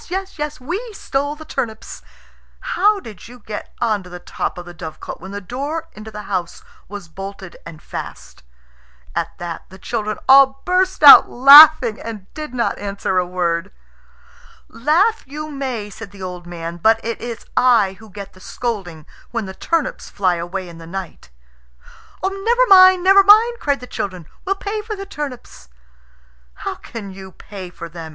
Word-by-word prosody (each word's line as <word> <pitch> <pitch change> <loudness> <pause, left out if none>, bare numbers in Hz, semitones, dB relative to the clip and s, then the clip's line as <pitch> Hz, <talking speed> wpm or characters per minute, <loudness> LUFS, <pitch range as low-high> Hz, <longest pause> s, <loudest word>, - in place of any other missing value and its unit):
yes! 380 -2 -5
yes! 300 0 -4
We 345 - -4
stole 285 -5 -3
the 315 +1 -12
turnips." 220 -6 -5 0.6
"How 420 -4 +1
did 215 - -12
you 245 +1 -13
get 215 -2 -8
on 220 -4 0
to 180 - -13
the 180 - -8
top 175 - -5
of 175 - -8
the 175 - -10
dovecot 160 -2 -8
when 190 - -9
the 200 +1 -5
door 280 - -5
into 215 +1 -10
the 210 -1 -8
house 180 -3 -4 0.2
was 200 -2 -9
bolted 195 +1 -9
and 160 -2 -12
fast?" 65 0 -9 0.7
At - - -3
that 170 -1 -7
the 190 - -13
children 215 +1 -4
all 270 0 +6
burst 370 -2 +1
out 285 - +10
laughing, 275 -2 +8
and 215 -4 -9
did 305 -4 -7
not 245 -2 -2
answer 200 -2 -2
a 180 - -1
word. 175 +1 -2 1.0
"Laugh 345 - +1
you 305 +2 -7
may," 255 -7 -4
said 225 0 -10
the 200 -1 -12
old 180 -1 -7
man; 170 0 -6
"but 220 +6 +3
it 230 0 -4
is 235 -1 -7
I 230 -6 +4
who 220 - -14
get 200 0 -10
the 185 - -18
scolding 185 -8 -5 0.2
when 230 -3 -3
the 190 - -8
turnips 330 - -2
fly 185 -3 +1
away 180 +2 -5
in 170 -1 -12
the 165 - -11
night." 180 - -8 0.9
"Never 445 +6 +1
mind! 370 -1 +7
never 390 +1 +7
mind!" 440 +4 +5
cried 285 - -1
the - - -7
children. 185 -8 -5 0.2
"We'll 390 +1 0
pay 415 +2 -4
for 430 0 -6
the 395 0 -7
turnips." 280 - -8 1.0
"How - - -2
can 210 -4 -9
you 190 0 -11
pay 190 -1 -10
for 170 -1 -9
them?" 165 -1 -9
220 Hz, 175 wpm, -19 LUFS, 185-300 Hz, 1.0 s, out